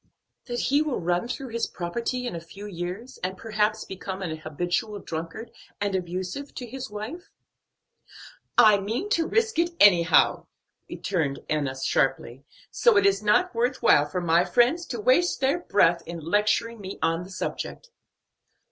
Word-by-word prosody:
"That 240 Hz, -1 st, -3 dB
he 285 Hz, +2 st, +2 dB
will 305 Hz, -4 st, -1 dB
run 175 Hz, +5 st, 0 dB
through 260 Hz, +1 st, -5 dB
his 230 Hz, 0 st, -2 dB
property 235 Hz, +8 st, -3 dB
in 240 Hz, -, -4 dB
a -, -, -4 dB
few 195 Hz, +5 st, -11 dB
years, 190 Hz, +6 st, -6 dB
and 185 Hz, +1 st, -3 dB
perhaps 215 Hz, 0 st, -1 dB
become 190 Hz, 0 st, -6 dB
an 160 Hz, -3 st, -3 dB
habitual 175 Hz, +7 st, -2 dB
drunkard 165 Hz, +6 st, -6 dB, 0.3 s
and 205 Hz, -1 st, -1 dB
abusive 185 Hz, +9 st, -4 dB
to 250 Hz, -, -5 dB
his 260 Hz, +1 st, -7 dB
wife." 250 Hz, -, -7 dB, 1.3 s
"I 210 Hz, -2 st, +7 dB
mean 230 Hz, -, -3 dB
to 330 Hz, -4 st, +2 dB
risk 450 Hz, -4 st, +1 dB
it 340 Hz, 0 st, +1 dB
anyhow," 175 Hz, -5 st, +5 dB, 0.4 s
returned 155 Hz, -8 st, -2 dB
Enna 140 Hz, -3 st, -1 dB
sharply, 135 Hz, -1 st, 0 dB, 0.3 s
"so 475 Hz, -4 st, +4 dB
it 400 Hz, -, +4 dB
is 395 Hz, -, +3 dB
not 210 Hz, +13 st, +2 dB
worth 245 Hz, +3 st, -1 dB
while 145 Hz, 0 st, +5 dB
for 180 Hz, +5 st, -3 dB
my 170 Hz, 0 st, +3 dB
friends 245 Hz, -, +2 dB
to 240 Hz, -, -4 dB
waste 260 Hz, -, +3 dB
their 275 Hz, +5 st, +1 dB
breath 175 Hz, -, +3 dB
in 170 Hz, 0 st, -6 dB
lecturing 210 Hz, +6 st, 0 dB
me 190 Hz, 0 st, -7 dB
on 165 Hz, +1 st, +1 dB
the 180 Hz, -, -9 dB
subject." 475 Hz, -, -5 dB
205 Hz, 160 wpm, -26 LUFS, 175-255 Hz, 1.3 s, I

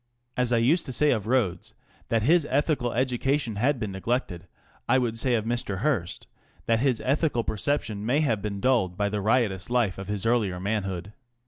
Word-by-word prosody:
As 125 Hz, -1 st, +1 dB
I 120 Hz, -, +4 dB
used 145 Hz, +9 st, +2 dB
to -, -, -4 dB
say 150 Hz, +4 st, +2 dB
of 110 Hz, -3 st, -1 dB
Rhodes 110 Hz, -8 st, 0 dB, 0.3 s
that 115 Hz, -2 st, +1 dB
his 160 Hz, +3 st, +4 dB
ethical 140 Hz, -3 st, +1 dB
education 130 Hz, -1 st, 0 dB
had 130 Hz, +4 st, +1 dB
been 105 Hz, -3 st, -3 dB
neglected, 95 Hz, -3 st, -3 dB, 0.4 s
I 130 Hz, -, +5 dB
would 120 Hz, -3 st, 0 dB
say 120 Hz, +2 st, +1 dB
of 110 Hz, -2 st, -1 dB
Mr. 115 Hz, -5 st, -2 dB
Hearst 115 Hz, -, -1 dB, 0.4 s
that 115 Hz, 0 st, +2 dB
his 130 Hz, -3 st, +1 dB
ethical 140 Hz, -2 st, +1 dB
perception 110 Hz, -2 st, -2 dB
may 130 Hz, +7 st, +2 dB
have 115 Hz, -9 st, 0 dB
been 100 Hz, -1 st, -4 dB
dulled 100 Hz, -7 st, +1 dB
by 105 Hz, 0 st, 0 dB
the 105 Hz, 0 st, -2 dB
riotous 105 Hz, -3 st, +1 dB
life 120 Hz, -6 st, +1 dB
of 95 Hz, -, -7 dB
his 105 Hz, 0 st, -2 dB
earlier 110 Hz, -6 st, +1 dB
manhood. 95 Hz, -1 st, -3 dB
115 Hz, 190 wpm, -26 LUFS, 100-130 Hz, 0.4 s, I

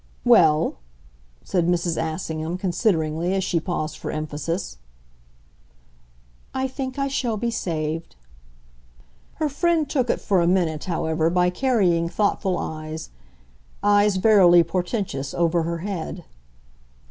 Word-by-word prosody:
"Well?" 165 Hz, -10 st, +4 dB, 0.7 s
said 175 Hz, -3 st, 0 dB
Mrs. 175 Hz, -1 st, +1 dB
Assingham, 160 Hz, +1 st, -3 dB
consideringly, 175 Hz, -2 st, 0 dB
as 190 Hz, -, 0 dB
she 170 Hz, -, 0 dB
paused 160 Hz, -2 st, -4 dB
for -, -, -5 dB
emphasis. 155 Hz, -, -4 dB, 1.8 s
"I 265 Hz, 0 st, 0 dB
think 260 Hz, 0 st, -5 dB
I 275 Hz, 0 st, 0 dB
shall 245 Hz, -5 st, -1 dB
be 235 Hz, +2 st, -1 dB
saved." 160 Hz, -, -3 dB, 1.2 s
Her 310 Hz, -, 0 dB
friend 320 Hz, +2 st, +1 dB
took 260 Hz, -4 st, 0 dB
it, -, -, +1 dB
for 190 Hz, -4 st, +1 dB
a 170 Hz, -, +2 dB
minute, 170 Hz, -4 st, +1 dB
however, 160 Hz, -2 st, 0 dB
by 180 Hz, +1 st, +2 dB
carrying 180 Hz, -8 st, +1 dB
thoughtful 195 Hz, -1 st, 0 dB
eyes, 155 Hz, 0 st, -6 dB, 0.7 s
eyes 205 Hz, 0 st, +4 dB
verily 185 Hz, -4 st, +6 dB
portentous, 175 Hz, -, -3 dB
over 170 Hz, 0 st, +2 dB
her 170 Hz, +1 st, -2 dB
head. 190 Hz, -6 st, -5 dB
175 Hz, 120 wpm, -23 LUFS, 160-210 Hz, 1.8 s, verily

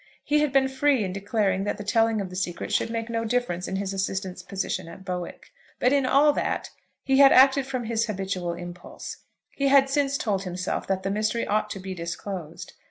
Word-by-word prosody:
He 300 Hz, 0 st, +2 dB
had 300 Hz, -2 st, +1 dB
been 270 Hz, 0 st, +4 dB
free 265 Hz, -2 st, +2 dB
in 185 Hz, -2 st, -3 dB
declaring 195 Hz, -1 st, 0 dB
that -, -, -2 dB
the 205 Hz, -, -6 dB
telling 225 Hz, +1 st, +2 dB
of 185 Hz, -2 st, -6 dB
the -, -, -8 dB
secret 180 Hz, -2 st, -3 dB
should -, -, +1 dB
make 230 Hz, 0 st, -3 dB
no 230 Hz, -1 st, -2 dB
difference 225 Hz, -6 st, -1 dB
in 190 Hz, -, -3 dB
his 195 Hz, 0 st, -2 dB
assistant's 190 Hz, -1 st, -3 dB
position 185 Hz, -1 st, -3 dB
at 190 Hz, +3 st, -11 dB
Bowick. 180 Hz, -1 st, -6 dB, 0.3 s
But 250 Hz, +2 st, +3 dB
in 275 Hz, -2 st, +2 dB
all 285 Hz, +3 st, +5 dB
that, -, -, -2 dB, 0.3 s
he 270 Hz, 0 st, +2 dB
had 275 Hz, -1 st, +9 dB
acted 270 Hz, +1 st, +6 dB
from 255 Hz, -2 st, -3 dB
his 230 Hz, 0 st, 0 dB
habitual 190 Hz, -4 st, -3 dB
impulse. 175 Hz, +1 st, -8 dB, 0.3 s
He 275 Hz, -, 0 dB
had 275 Hz, 0 st, +5 dB
since 280 Hz, -1 st, +1 dB
told 205 Hz, -7 st, -1 dB
himself 180 Hz, -1 st, -3 dB
that 190 Hz, -1 st, -1 dB
the 195 Hz, -, -1 dB
mystery 215 Hz, +3 st, 0 dB
ought 210 Hz, 0 st, 0 dB
to 200 Hz, -, -5 dB
be 190 Hz, 0 st, -6 dB
disclosed. 170 Hz, 0 st, -6 dB
210 Hz, 210 wpm, -26 LUFS, 185-260 Hz, 0.3 s, had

